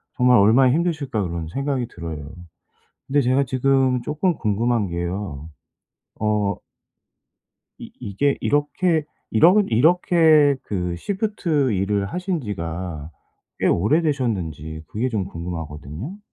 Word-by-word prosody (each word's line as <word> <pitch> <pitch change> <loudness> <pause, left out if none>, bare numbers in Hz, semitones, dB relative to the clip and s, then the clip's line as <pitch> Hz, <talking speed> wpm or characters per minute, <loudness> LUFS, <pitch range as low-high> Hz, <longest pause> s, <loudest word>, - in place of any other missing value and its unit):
정말 125 -2 +5
'얼마나 120 +6 +5
힘드실까?' 155 -9 -1
그런 85 -2 -4
생각이 135 +1 -2
들어요. 80 -3 -7 0.8
근데 145 +2 +2
제가 130 +2 +2
지금 130 0 +2
쪼끔 155 +3 0
궁금한 110 -1 0
게요. 85 -3 -4 0.7
어 105 -2 0 1.2
이 - - -10
이게 135 +8 0
이렇게 155 +2 +1 0.3
이러 165 - +6
이렇게 155 +1 +4
그 90 -3 -3
시프트 170 - -1
일을 100 +1 0
하신 180 - -3
지가 85 - -5 0.5
꽤 - - 0
오래되셨는지 95 - 0
그게 120 +8 -2
좀 105 -6 -2
궁금하거든요? 85 - -7
115 Hz, 250 characters per minute, -22 LUFS, 90-145 Hz, 1.2 s, 이러